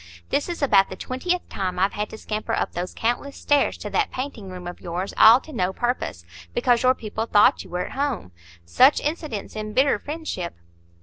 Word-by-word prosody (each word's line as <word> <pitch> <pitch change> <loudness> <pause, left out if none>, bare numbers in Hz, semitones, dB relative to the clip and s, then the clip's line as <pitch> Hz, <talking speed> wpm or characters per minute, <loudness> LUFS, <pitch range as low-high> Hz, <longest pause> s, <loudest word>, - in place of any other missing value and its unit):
This 290 - 0
is 345 -4 -4
about 200 -8 +5
the - - -6
twentieth 350 +8 -2
time 185 -2 -3
I've 190 +2 +2
had 210 0 -3
to - - -9
scamper 215 0 -4
up - - -1
those 175 +1 -5
countless 245 +5 -2
stairs 290 -1 +2
to - - -6
that 430 - +1
painting 255 -7 -6
room 180 -1 -8
of 175 0 -7
yours, 180 +2 -4
all 225 +3 +8
to 310 - -12
no 185 -5 0
purpose, 240 - -2 0.3
because 240 -2 +3
your 255 0 +4
people 220 0 -4
thought 210 -2 +4
you - - -15
were 180 0 -2
at - - -9
home. 270 - -2 0.3
Such 260 - +5
incidents 295 - -4
embitter 215 +6 +1
friendship." 295 - -5
225 Hz, 195 wpm, -24 LUFS, 190-280 Hz, 0.3 s, all